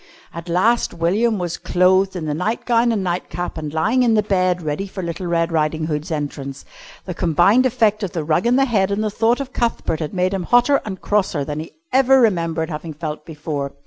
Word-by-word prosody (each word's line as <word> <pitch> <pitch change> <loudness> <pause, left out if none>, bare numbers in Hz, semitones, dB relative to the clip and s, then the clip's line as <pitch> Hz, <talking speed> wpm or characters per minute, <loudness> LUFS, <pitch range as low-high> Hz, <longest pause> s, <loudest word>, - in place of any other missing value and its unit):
At 170 +1 -8
last 190 +5 +2
William 205 +7 +1
was 175 -2 -3
clothed 185 +2 +2
in 170 -3 -4
the 150 - -1
nightgown 230 +7 +1
and 210 -4 -1
nightcap 175 0 -3
and 155 -2 -5
lying 210 - +1
in 235 -3 +3
the 210 - +3
bed 185 -4 +1
ready 155 +6 -3
for 190 -1 -7
little 170 +2 -4
Red 170 0 0
Riding 155 0 0
Hood's 155 0 -3
entrance. 145 -3 -5 0.4
The 180 - -4
combined 180 - +3
effect 220 -4 +1
of 195 -4 -3
the 165 - -2
rug 165 +7 +1
and 245 +2 +3
the 270 - +4
head 205 -6 +1
and 200 +2 -1
the 215 - -1
thought 230 +4 +1
of 270 -2 -6
Cuthbert 230 -8 -1
had 155 +2 -4
made 185 +1 +1
him 195 - -1
hotter 245 +6 +4
and 190 -4 -5
crosser 190 -8 0
than 150 +1 -4
he 160 - -8 0.2
ever 265 0 +5
remembered 170 -7 +1
having 155 +1 -6
felt 155 0 -6
before. 145 -3 -4
180 Hz, 210 wpm, -20 LUFS, 160-220 Hz, 0.4 s, ever